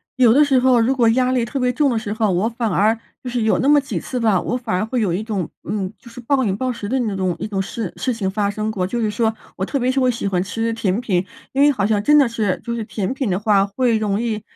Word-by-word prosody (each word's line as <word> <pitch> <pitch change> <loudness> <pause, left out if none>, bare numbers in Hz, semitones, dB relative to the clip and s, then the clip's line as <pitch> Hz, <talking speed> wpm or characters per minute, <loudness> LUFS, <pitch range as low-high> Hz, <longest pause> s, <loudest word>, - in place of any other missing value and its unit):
有 245 -4 +5
的 295 +3 +5
时 275 -2 +3
候 255 -1 +4
如 240 +4 +2
果 235 -3 +4
压 255 +2 +2
力 250 -2 +1
特 250 +4 -3
别 250 -1 +2
重 290 +2 +2
的 230 - 0
时 210 -1 -4
候， 215 -2 +1
我 180 +5 +1
反 230 -1 -2
而 215 +5 +2 0.2
就 250 - -6
是 245 -1 -1
有 220 0 +2
那 265 - +1
么 290 0 +6
几 275 - -4
次 255 - -5
吧， 215 -5 +3
我 240 - -2
反 240 -5 -3
而 190 - 0
会 240 +2 -1
有 190 -6 0
一 185 - -1
种， 210 -6 -3 0.2
嗯， 195 -2 -2
就 240 - -14
是 235 +1 -10
暴 265 +3 +1
饮 195 -3 0
暴 255 +4 -2
食 225 -4 -6
的 260 +5 0
那 225 -5 -1
种 185 -2 0
一 - - -4
种 200 -2 -2
事 195 0 -4
事 255 - -1
情 195 -4 -2
发 205 0 0
生 215 +1 -2
过。 185 -4 -2
就 235 +4 -2
是 215 -2 0
说 220 +1 0 0.2
我 190 - -1
特 275 - -2
别 255 -1 +1
是 270 - 0
我 255 -1 +3
喜 235 -4 -3
欢 185 -3 0
吃 225 +4 -2
甜 220 -1 -1
品， 185 -7 0 0.3
因 270 - 0
为 290 - +6
好 215 -9 0
像 210 -1 +1
真 295 +8 +5
的 275 -5 +5
是， 215 -5 -1
就 235 - -3
是 235 - -3
甜 205 +2 -3
品 265 -4 -2
的 180 - +1
话， 200 -1 +3
会 230 +3 +1
容 210 -1 -1
易 220 -3 -2
225 Hz, 325 characters per minute, -20 LUFS, 205-250 Hz, 0.3 s, 么